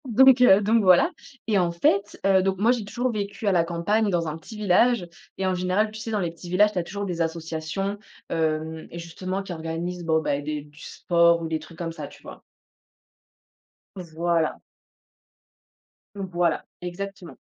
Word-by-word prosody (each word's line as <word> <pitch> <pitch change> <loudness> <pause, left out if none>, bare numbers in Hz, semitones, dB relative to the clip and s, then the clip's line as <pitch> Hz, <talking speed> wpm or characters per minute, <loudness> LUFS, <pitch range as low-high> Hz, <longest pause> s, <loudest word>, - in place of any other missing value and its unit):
Donc 255 +2 +6
heu, 205 -5 +7
donc 220 +3 +3
voilà 185 - +5 0.3
et 210 -3 +2
en 175 -1 +1
fait, 200 +4 +1
heu, 190 -1 +5
donc 190 0 0
moi, 220 +5 +3
j'ai 245 -3 -1
toujours 240 +5 -2
vécu 205 -1 -4
à - - +4
la 175 -3 +3
campagne 175 +6 0
dans 170 -3 0
un 155 - -3
petit 190 +7 -11
village, 210 0 +3 0.3
et 190 - -1
en 185 - +1
général, 185 +4 0
tu 215 - -9
sais, 225 - -6
dans 215 -2 0
les 175 -3 -1
petits 170 +1 -11
villages, 205 +4 +4
tu 185 - 0
as - - -1
toujours 200 +4 -5
des 175 -3 -3
associations, 165 +4 -3 0.3
hem, 160 0 -2
justement 185 +3 -5
qui 195 - -6
organisent 165 +2 -4
bon, 160 -1 +2
ben, 145 -2 -1
des 150 0 -3
du 150 +1 -19
sport 170 0 +2
ou - - -2
des 160 -1 -2
trucs 160 +1 -14
comme 165 -1 -4
ça, 165 - -7
tu - - -16
vois? - - -11 1.6
Voilà. 170 -2 -1 1.5
Voilà 175 -4 -1 0.2
exactement. 190 +1 -7
180 Hz, 180 wpm, -25 LUFS, 165-200 Hz, 1.6 s, heu